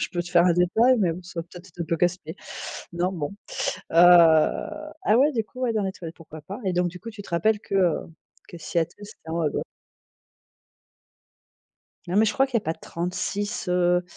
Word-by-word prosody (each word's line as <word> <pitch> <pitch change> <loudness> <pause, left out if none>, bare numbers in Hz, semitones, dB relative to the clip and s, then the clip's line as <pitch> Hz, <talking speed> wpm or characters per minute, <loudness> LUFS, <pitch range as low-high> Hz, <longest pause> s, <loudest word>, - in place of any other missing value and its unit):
je - - -1
peux 175 - -1
te 175 - -10
faire 175 -1 +5
un 175 - +5
détail, 220 +9 +4
mais 180 -6 +2
bon 180 +3 -8
ça 175 -1 -6
va - - -8
peut 180 +1 -12
être 185 +3 -15
être 175 0 -14
un - - -4
peu 165 +1 -1
casse-pied. 175 -1 -1 0.6
Non 175 +2 0
bon, 165 +1 -4 0.6
heu, - - -5
ah 175 - +4
ouais, 290 +4 +4
du 225 -4 -1
coup, 250 +4 -14
ouais, 245 -3 +1
dans 215 -2 0
les 190 - -1
toilettes, 170 -3 -9
pourquoi 160 -2 -12
pas? 195 +10 -8
Et 185 - 0
donc 180 0 +1
du 180 +1 -8
coup, 230 - -8
tu 215 -2 -9
te - - -13
rappelles 205 +5 +1
que, 200 - -5
heu, 180 -4 +3 0.5
que 175 - -10
Seattle, 170 0 -2
c'était 200 -6 -14
en 165 - -3
haut 170 - 0
à 150 - +2
gau - - -3 2.5
Non 180 +3 -2
mais 220 - +6
je 210 - +1
crois 270 +5 +3
qu'il 265 - -19
y - - -9
a - - -27
pas 160 +1 -1
36, 185 +4 -4
heu 180 0 +2
180 Hz, 235 wpm, -25 LUFS, 170-205 Hz, 2.5 s, mais